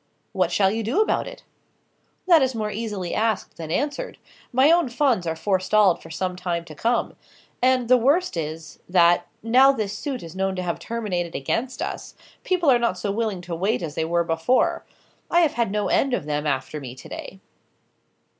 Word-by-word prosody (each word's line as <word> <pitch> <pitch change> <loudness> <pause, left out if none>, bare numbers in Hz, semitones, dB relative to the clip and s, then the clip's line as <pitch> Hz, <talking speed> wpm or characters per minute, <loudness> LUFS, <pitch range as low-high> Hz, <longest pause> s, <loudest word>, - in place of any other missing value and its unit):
"What - - 0
shall 195 -2 +3
you 225 +2 -2
do 235 - 0
about 430 - +1
it?" - - -10 0.8
"That 335 -4 +6
is 260 -2 +1
more 215 -1 -2
easily 210 -5 -4
asked 220 -2 -1
than 160 -2 -7
answered. 285 - -2 0.3
My 265 +5 +5
own 340 -5 +3
funds 240 - +1
are 160 - -1
forestalled 190 +1 +2
for 165 - -12
some 180 +3 -3
time 175 -2 -3
to 160 - -10
come. 235 +10 -1 0.5
And, 255 -1 +3
the 255 +1 +6
worst 285 - +2
is, 155 -1 -5
that, 175 -1 +4 0.2
now 255 +4 +6
this 215 -6 -3
suit 260 +3 -4
is 165 +1 -10
known 190 0 -1
to 185 - -3
have 170 -1 -3
terminated 185 -7 -3
against 230 - -2
us, - - -6 0.3
people 355 -6 +2
are 245 - +4
not 235 -6 0
so 200 +1 -2
willing 210 -3 -2
to 175 -1 -7
wait 190 +2 0
as 155 -3 -4
they 160 - -1
were 170 +1 +1
before. 165 +10 +1 0.5
I 345 - +4
have 320 -4 +2
had 235 -4 0
no 210 0 0
end 270 -2 +2
of 155 - -5
them 150 0 -2
after 135 +1 -2
me 130 -3 -8
to 130 - -12
day." - - -8
205 Hz, 195 wpm, -23 LUFS, 170-250 Hz, 0.8 s, That